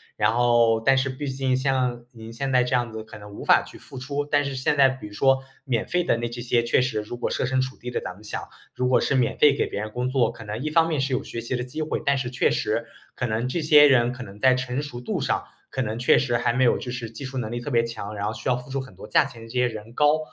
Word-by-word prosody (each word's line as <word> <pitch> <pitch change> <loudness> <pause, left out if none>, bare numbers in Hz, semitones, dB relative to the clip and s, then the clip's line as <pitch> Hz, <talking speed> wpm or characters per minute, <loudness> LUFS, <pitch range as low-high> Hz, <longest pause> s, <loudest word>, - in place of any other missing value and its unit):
然 105 - +2
后 120 -2 +4
但 135 +4 +4
是 135 0 +1
毕 135 +3 -5
竟 130 -1 0
像 130 -3 0
您 115 -1 -10
现 135 +3 -3
在 125 -1 +4
这 125 +1 0
样 120 -2 0
子 110 0 -6
可 110 -1 -12
能 105 0 -12
无 - - -8
法 - - +5
去 - - -13
付 130 - -9
出， 140 +2 -3
但 145 0 +1
是 140 -1 -3
现 130 +3 0
在 135 -1 +7
比 130 -4 -7
如 105 - -13
说 135 +4 +3 0.2
免 125 -5 -1
费 180 0 +1
的 165 - +2
那 120 0 -3
这 120 +1 -7
些 120 -1 +1
确 120 - +2
实 125 -4 -1
如 105 +3 -7
果 120 - -2
设 - - 0
身 130 0 +1
处 130 0 -4
地 125 - -7
的 125 - -2
咱 - - -6
们 105 +4 -17
想， 105 - -5 0.3
如 125 0 0
果 125 - +3
是 140 - +1
免 130 -2 +1
费 145 -2 +6
给 - - +2
别 - - -4
人 105 +1 -4
工 125 +3 -2
作， 130 -4 +2
可 110 - -11
能 105 +3 -5
一 155 - -1
方 165 +1 +4
面 155 -4 0
是 135 0 -1
有 125 - 0
学 115 - -6
习 120 +2 -3
的 125 - -2
机 130 +5 -5
会， 155 - -2
但 140 - +3
是 125 -2 -2
确 125 - +1
实 - - -1 0.3
可 - - -2
能 115 +2 -1
这 165 +6 -2
些 150 -1 +8
人 120 -3 +4
可 125 - -9
能 100 -3 -9
在 130 +4 +5
成 130 +2 -2
熟 125 -4 -7
度 125 - -2
上， - - -1 0.3
可 130 - -2
能 110 -2 -2
确 125 - +4
实 120 -4 +1
还 115 - +1
没 130 +2 +2
有 120 - +4
就 125 - -6
是 120 -2 -5
技 115 +5 -8
术 130 0 -4
能 110 -2 -4
力 120 - -3
特 135 +4 -6
别 115 -1 +3
强， 115 -3 -6
然 100 0 -2
后 110 - -2
需 - - -7
要 125 - +3
付 125 +1 -8
出 135 +1 -2
很 130 -1 -9
多 - - -10
价 - - +4
钱 120 -4 -10
的 115 - -10
这 - - -12
些 125 0 +2
人 110 0 -8
高。 150 +1 +4
125 Hz, 335 characters per minute, -24 LUFS, 115-135 Hz, 0.3 s, 些